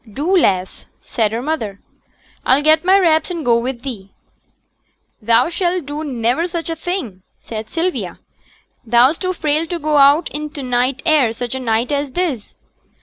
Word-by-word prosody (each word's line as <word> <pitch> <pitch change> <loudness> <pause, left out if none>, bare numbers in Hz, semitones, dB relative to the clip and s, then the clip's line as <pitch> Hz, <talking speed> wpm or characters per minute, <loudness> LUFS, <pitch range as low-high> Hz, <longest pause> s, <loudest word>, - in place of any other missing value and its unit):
'Do, 310 - 0
lass,' 190 - 0
said 220 -4 -1
her 230 +2 -3
mother. 225 -10 -3 0.6
'I'll 270 +3 +3
get 310 +1 +4
my 375 +2 +5
wraps 320 -4 +2
and 340 -4 -4
go 235 -1 +4
with 245 0 -4
thee.' 205 -8 -7 1.1
'Thou 230 +6 +3
shall 350 +1 0
do 295 0 -6
niver 255 +3 0
such 335 -1 -4
a - - -2
thing,' 320 - -5 0.2
said 220 -1 -7
Sylvia. 345 +2 -2 0.7
'Thou's 240 +6 +3
too 370 -1 -1
frail 310 -1 -1
to 350 - -3
go 305 -2 0
out 285 +4 +5
i' 300 +1 -4
t' 290 -2 -8
night 250 +1 0
air 295 -8 +3
such 240 +1 -5
a 265 - -3
night 235 +1 0
as 285 -2 -2
this.' 320 - -3
285 Hz, 170 wpm, -18 LUFS, 235-325 Hz, 1.1 s, my